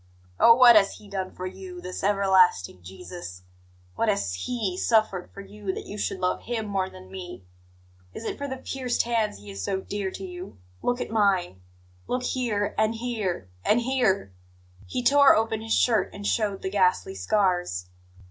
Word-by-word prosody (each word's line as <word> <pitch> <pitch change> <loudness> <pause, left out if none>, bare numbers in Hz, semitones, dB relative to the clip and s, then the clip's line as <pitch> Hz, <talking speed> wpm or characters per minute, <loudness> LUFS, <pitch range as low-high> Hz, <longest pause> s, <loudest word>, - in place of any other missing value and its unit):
Oh, 230 - +8
what 240 -1 +8
has 200 -2 +5
He 210 - -14
done 190 -2 -3
for 185 - -7
you, 185 -1 -8
this 180 +1 -6
everlasting 190 - +3
Jesus, 90 - -9 0.5
what 225 - 0
has 150 - 0
He 195 - -2
suffered 215 -3 +1
for 200 - -9
you, 200 0 -5
that - - -6
you 205 - -7
should 200 -2 -2
love 180 0 0
Him 230 -2 -3
more 195 -2 -1
than 185 0 -13
me? 180 - -8 0.7
Is - - -8
it - - -3
for 285 - -3
the 265 -1 -4
pierced 255 -1 -2
hands 230 - 0
He 100 0 -11
is 100 0 -6
so 190 - -1
dear 200 0 -3
to 190 +1 -7
you? 180 - -9 0.2
Look 245 0 0
at - - -4
mine! 190 - +1 0.5
Look 250 0 -1
here, 230 -6 -1
and 220 +1 +2
here, 215 - -3
and 220 - +3
here 235 - +1 0.3
" 90 +2 -25
He 245 - -3
tore 280 +2 +7
open 220 0 0
his 225 0 0
shirt 230 -3 +2
and 205 0 -7
showed 205 -3 0
the 190 - -2
ghastly 185 - +2
scars. 175 - 0
195 Hz, 185 wpm, -26 LUFS, 180-225 Hz, 0.7 s, Oh